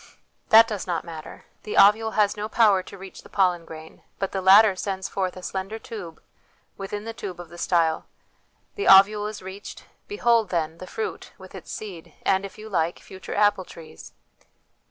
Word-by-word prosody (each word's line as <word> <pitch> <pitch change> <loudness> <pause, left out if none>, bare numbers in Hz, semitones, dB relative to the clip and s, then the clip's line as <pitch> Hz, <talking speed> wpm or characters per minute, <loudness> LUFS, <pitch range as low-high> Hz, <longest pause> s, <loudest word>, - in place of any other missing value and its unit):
That 225 +1 +8
does 210 -5 -5
not 175 -2 -2
matter; 160 -2 -10 0.2
the 210 - -5
ovule 215 +2 +5
has 205 -1 +3
no 210 +1 -5
power 210 -5 +4
to 200 - -12
reach 190 0 -11
the - - -17
pollen 180 -4 +1
grain, 160 0 -12 0.2
but 195 - -3
the 190 - -3
latter 195 +2 +7
sends 190 0 -4
forth 185 -1 -3
a 185 - -10
slender 195 +4 -4
tube, 200 -7 -9 0.6
within 205 +2 -6
the 225 - -5
tube 190 -5 -7
of 175 -2 -9
the 175 - -12
style; 165 -3 +1 0.7
the 405 - -3
ovule 205 +2 +6
is 210 -3 -8
reached; 190 +2 -9 0.2
behold, 235 - +1
then, 165 -2 -2
the 185 - -9
fruit, 445 - -6
with - - -14
its - - -10
seed, 190 -6 -9
and, 190 0 +1
if 195 - -11
you 215 +1 -10
like, 170 -4 -1
future 190 0 -9
apple 205 -2 +3
trees 160 - -13
195 Hz, 185 wpm, -24 LUFS, 180-210 Hz, 0.7 s, That